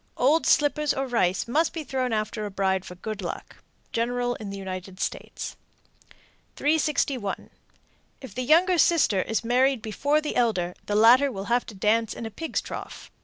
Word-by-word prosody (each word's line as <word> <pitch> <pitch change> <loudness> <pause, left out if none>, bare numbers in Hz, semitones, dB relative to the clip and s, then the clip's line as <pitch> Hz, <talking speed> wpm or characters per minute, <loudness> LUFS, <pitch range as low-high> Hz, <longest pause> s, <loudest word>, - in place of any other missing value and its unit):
Old 295 +6 +3
slippers 295 0 +3
or 270 - -1
rice 210 -8 0
must 305 +7 +1
be 325 - -4
thrown 260 -3 -2
after 215 0 -2
a 205 - -3
bride 190 -1 0
for 180 - -9
good 210 +3 -6
luck. 175 - -6 0.3
General 245 +1 0
in 210 - -7
the 200 - -6
United 185 -1 -7
States. - - -4 1.0
361. 285 -8 0 0.7
If 260 -8 -10
the 255 - -3
younger 335 +7 +4
sister 285 - +4
is 225 +3 -2
married 255 +1 +2
before 285 +7 +1
the 305 -1 -4
elder, 185 -8 +1
the 205 - -1
latter 245 +6 +6
will 195 -4 -5
have 245 - +1
to 215 - -9
dance 215 +3 +1
in 230 - -6
a 225 - -5
pig's 325 +9 -3
trough. - - -8
235 Hz, 170 wpm, -26 LUFS, 205-280 Hz, 1.0 s, latter